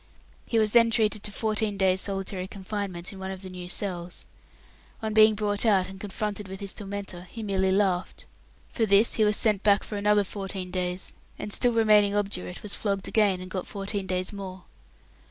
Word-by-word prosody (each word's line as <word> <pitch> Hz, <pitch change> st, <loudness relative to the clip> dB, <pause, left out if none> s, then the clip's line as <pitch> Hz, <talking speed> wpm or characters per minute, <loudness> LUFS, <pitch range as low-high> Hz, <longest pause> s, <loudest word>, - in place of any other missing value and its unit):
He 230 Hz, -, 0 dB
was 215 Hz, -1 st, +3 dB
then 230 Hz, 0 st, +6 dB
treated 215 Hz, -2 st, +1 dB
to 210 Hz, -, 0 dB
fourteen 215 Hz, -1 st, -1 dB
days' 190 Hz, -1 st, +3 dB
solitary 195 Hz, -1 st, -2 dB
confinement 195 Hz, -2 st, -5 dB
in 195 Hz, -, -10 dB
one 190 Hz, 0 st, -5 dB
of 190 Hz, 0 st, -7 dB
the 185 Hz, -, -8 dB
new 180 Hz, -1 st, -8 dB
cells. 180 Hz, -2 st, -3 dB, 0.8 s
On 220 Hz, -1 st, -1 dB
being 215 Hz, 0 st, +6 dB
brought 205 Hz, -1 st, -1 dB
out 200 Hz, -5 st, +3 dB
and 190 Hz, 0 st, -10 dB
confronted 205 Hz, 0 st, -4 dB
with 190 Hz, 0 st, -8 dB
his 200 Hz, -2 st, -6 dB
tormentor, 195 Hz, -3 st, -6 dB
he 225 Hz, +2 st, -7 dB
merely 190 Hz, -2 st, +1 dB
laughed. 190 Hz, -2 st, 0 dB, 0.4 s
For 225 Hz, -3 st, 0 dB
this 200 Hz, +3 st, +5 dB
he 220 Hz, -, +3 dB
was 210 Hz, -1 st, +4 dB
sent 210 Hz, -4 st, +2 dB
back 205 Hz, -1 st, +4 dB
for 210 Hz, -, -5 dB
another 210 Hz, 0 st, +3 dB
fourteen 190 Hz, -2 st, -5 dB
days; 180 Hz, 0 st, -2 dB, 0.2 s
and 210 Hz, -, -3 dB
still 245 Hz, -1 st, +3 dB
remaining 210 Hz, -2 st, +4 dB
obdurate, 195 Hz, -3 st, -3 dB
was 210 Hz, -, -2 dB
flogged 200 Hz, -2 st, -2 dB
again, 200 Hz, -4 st, +2 dB
and 185 Hz, 0 st, -9 dB
got 185 Hz, -2 st, -4 dB
fourteen 200 Hz, -1 st, -3 dB
days 185 Hz, +2 st, 0 dB
more. 190 Hz, -2 st, -7 dB
200 Hz, 190 wpm, -27 LUFS, 190-210 Hz, 0.8 s, then